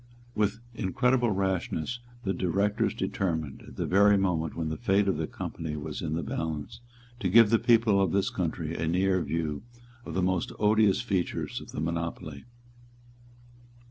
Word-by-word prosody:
With 105 +1 0
incredible 125 +3 +1
rashness 95 +1 -1 0.2
the 95 - 0
Directors 100 +3 0
determined, 80 -7 -2
at - - -12
the - - -2
very 100 +2 +5
moment 85 -5 0
when 80 -1 -2
the 80 - -2
fate 100 -3 +2
of 95 - +1
their 80 - -1
company 80 -2 -5
was 75 0 -5
in 80 -2 -2
the 85 - -2
balance, 75 - -4 0.4
to - - 0
give 115 -2 +7
the 115 - +5
people 115 -4 +4
of 95 -4 +2
this 100 0 +1
country 80 -2 -2
a 80 - -2
near 95 +2 +2
view 80 -3 -2 0.4
of 80 - -7
the 95 - +1
most 90 -1 0
odious 105 -1 +3
features 95 -7 -2
of - - -11
the - - -5
monopoly. 85 -2 -4
95 Hz, 165 wpm, -28 LUFS, 80-105 Hz, 0.4 s, give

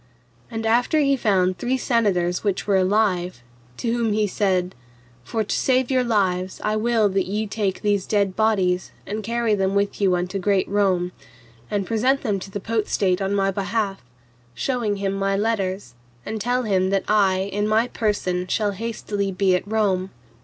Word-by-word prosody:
And 225 0 -4
after 240 +7 +2
he 275 -2 +3
found 185 -6 +1
three 255 +5 0
senators 195 -9 +1
which 200 -3 -1
were 200 - +2
alive, 185 - +1 0.3
to 235 - -2
whom 230 -3 0
he 210 0 +2
said, 185 -2 0 0.5
For 220 - -2
to 210 - -2
save 260 0 +1
your 255 -1 +3
lives 190 -5 0
I 215 0 0
will 220 -1 +2
that 190 -1 0
ye 210 +3 -1
take 205 -2 -2
these 205 -2 +1
dead 200 -3 +1
bodies, 190 -5 +1 0.2
and 210 +2 -4
carry 230 +1 0
them 195 -1 +1
with 200 +1 0
you 190 -2 +3
unto 180 +2 -2
great 195 0 +1
Rome, 190 -3 +1 0.6
and 200 -2 -1
present 255 +6 +1
them 205 -6 0
to 190 - -8
the 205 - -5
Potestate 205 -3 0
on 195 +1 0
my 195 -1 +2
behalf, 200 0 -2 0.5
shewing 235 - -1
him 195 -1 -2
my 195 0 0
letters, 195 - -1 0.3
and 220 0 -4
tell 245 +3 0
them 190 -4 +1
that 195 0 +1
I 200 -3 +3 0.2
in 205 +1 0
my 220 +3 +2
person 185 -6 -1
shall 210 +1 0
hastily 205 -1 -3
be 185 0 +2
at 180 - -3
Rome. 200 -4 0
205 Hz, 175 wpm, -23 LUFS, 190-220 Hz, 0.6 s, he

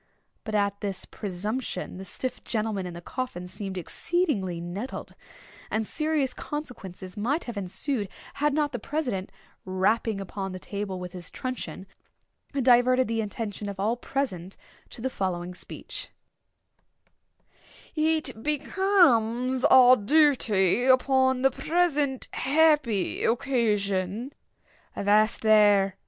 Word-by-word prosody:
But 215 -1 -4
at 200 -1 0
this 195 -2 -4
presumption 205 +1 -4
the 190 - -7
stiff 255 +6 -4
gentleman 215 -4 -2
in 175 - -7
the 170 - -8
coffin 215 -8 -5
seemed 190 +1 -6
exceedingly 200 - -1
nettled; 185 +9 -6 0.6
and 220 0 -1
serious 305 0 0
consequences 195 - -7
might 255 +10 0
have 240 - -6
ensued, 200 +3 -2 0.2
had 295 +1 +1
not 295 0 +1
the 245 - -4
president, 245 -8 -3 0.3
rapping 195 +3 +1
upon 195 0 -5
the 185 - -6
table 200 -1 -4
with 180 0 -7
his 180 -2 -6
truncheon, 235 -9 -5 0.7
diverted 255 -1 +4
the 225 0 0
attention 210 -1 -4
of 195 -1 -7
all 215 +4 +1
present 195 -9 -3 0.3
to - - -10
the 260 - -1
following 180 -3 -3
speech: 180 - -8 1.8
"It 310 -6 0
becomes 260 - +2
our 255 -1 +8
duty 245 - +3
upon 260 0 +3
the 270 - +5
present 300 -6 0
happy 285 - +2
occasion—" 225 -3 0 0.6
"Avast 210 +2 +3
there!" 205 -3 +5
225 Hz, 115 wpm, -27 LUFS, 195-265 Hz, 1.8 s, our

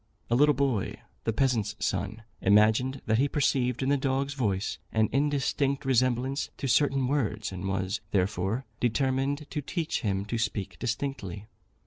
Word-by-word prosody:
A - - +5
little 145 +2 +5
boy, 130 -6 0 0.3
the 115 - +2
peasant's 110 -4 +1
son, 100 +4 -2 0.2
imagined 110 +7 +4
that 110 +1 +2
he 140 - +4
perceived 130 -4 +1
in 135 - +1
the 145 - +4
dog's 135 +1 0
voice 105 -7 -1
an 110 -1 +2
indistinct 140 0 +1
resemblance 130 +1 +1
to 135 - -3
certain 135 0 +3
words, 110 -7 -1
and 95 0 -5
was, 95 +2 -1
therefore, 100 +5 0
determined 135 +4 0
to 150 - -2
teach 160 +3 -2
him 100 -4 -1
to 115 +2 -2
speak 100 -3 -3
distinctly. 110 -5 -3
125 Hz, 150 wpm, -28 LUFS, 105-135 Hz, 0.3 s, A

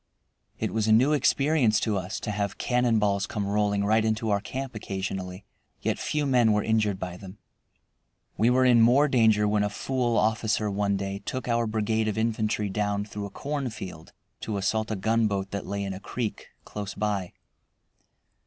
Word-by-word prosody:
It - - -2
was 110 -1 0
a - - +4
new 130 +7 +5
experience 140 -5 +3
to 110 -2 0
us, 95 +2 -3
to 105 - -3
have 100 -1 -2
cannonballs 110 -5 +1
come 105 -2 -3
rolling 100 0 +1
right 110 +2 +3
into 110 0 0
our 100 - +2
camp 130 +4 -5
occasionally. 95 -2 -5 0.3
Yet - - -1
few 150 -1 -1
men 120 -5 +4
were 105 - +1
injured 105 -3 +1
by 90 -1 -5
them. 95 +1 -11 1.0
We 115 - +3
were 130 +1 +4
in 120 -2 +6
more 130 +6 +5
danger 110 -5 +3
when 105 0 +2
a 105 - 0
fool 120 +2 -1
officer 110 -1 +1
one 100 0 0
day 100 0 -4
took 130 +5 -4
our 115 -1 +1
brigade 110 0 0
of 110 - -2
infantry 110 -2 0
down 100 0 -1
through 105 -1 -6
a - - -11
cornfield 110 - -5 0.3
to 105 -2 -3
assault 110 +3 0
a 110 - -1
gunboat 100 -1 0
that 100 -1 -4
lay 100 0 -3
in 95 -1 -3
a 95 - -7
creek 115 +2 -4 0.2
close 100 -2 -6
by. 100 -4 -2
105 Hz, 180 wpm, -26 LUFS, 100-115 Hz, 1.0 s, in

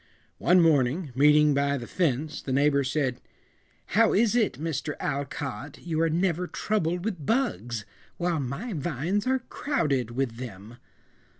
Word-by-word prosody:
One 180 +1 +5
morning, 150 0 +2
meeting 150 +2 +5
by 140 0 +1
the 120 - -6
fence, 150 -1 -1
the 135 - -5
neighbor 140 +1 +3
said, 130 -2 -1 0.7
"How 225 +1 +5
is 225 +2 +3
it, 225 - +2
Mr. 150 +1 -3
Alcott, 140 0 -4
you 165 -2 -2
are 165 - +3
never 175 +1 0
troubled 175 -4 -1
with 185 -9 -3
bugs, 125 - -1 0.3
while 175 -2 0
my 145 - -4
vines 175 - -1
are 260 0 +3
crowded 140 - -1
with 120 -1 -2
them?" 115 -2 -9
150 Hz, 140 wpm, -27 LUFS, 135-180 Hz, 0.7 s, One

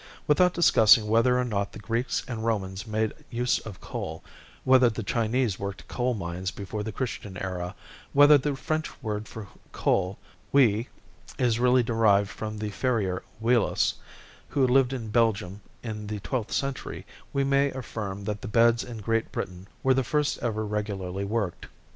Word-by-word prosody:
Without 180 +5 +4
discussing 110 -9 +6
whether 115 +3 +4
or 125 - +2
not 100 -4 -2
the - - -8
Greeks 115 +4 -1
and 115 -3 -4
Romans 100 -2 -2
made 110 0 0 0.2
use 120 +1 +1
of 105 -5 -9
coal, - - -6 0.4
whether 130 -2 +6
the 110 0 -5
Chinese 115 0 0
worked 100 0 -6
coal 125 0 -1
mines 90 -1 -4
before 100 +2 -5
the 110 +1 -4
Christian 105 -5 -5
era, 90 0 -4 0.4
whether 145 +1 +8
the 145 0 +1
French 155 +3 -2
word 105 -1 -3
for 110 -3 -8 0.2
coal 95 +1 0 0.3
(houille) 115 -5 +4 0.5
is 120 -3 +1
really 125 0 +4
derived 110 -4 +3
from 110 0 -5
the 105 0 -4
farrier 105 -7 0 0.2
Houillos, 115 0 +2 0.6
who 135 -2 +2
lived 130 0 +4
in 120 -5 -4
Belgium 105 -4 +1 0.2
in 105 -3 -5
the 105 0 -4
twelfth 120 +1 -3
century, 135 -1 -3 0.3
we 140 - +1
may 140 +1 +3
affirm 105 -7 -5
that 105 0 -3
the - - -6
beds 115 +2 +4
in 115 -3 -8
Great 115 +1 0
Britain 90 +1 -5 0.2
were 130 - +5
the 135 0 +1
first 150 +3 0
ever 110 -2 -1
regularly 100 -2 -3
worked. 105 -3 -2
110 Hz, 165 wpm, -27 LUFS, 100-125 Hz, 0.6 s, whether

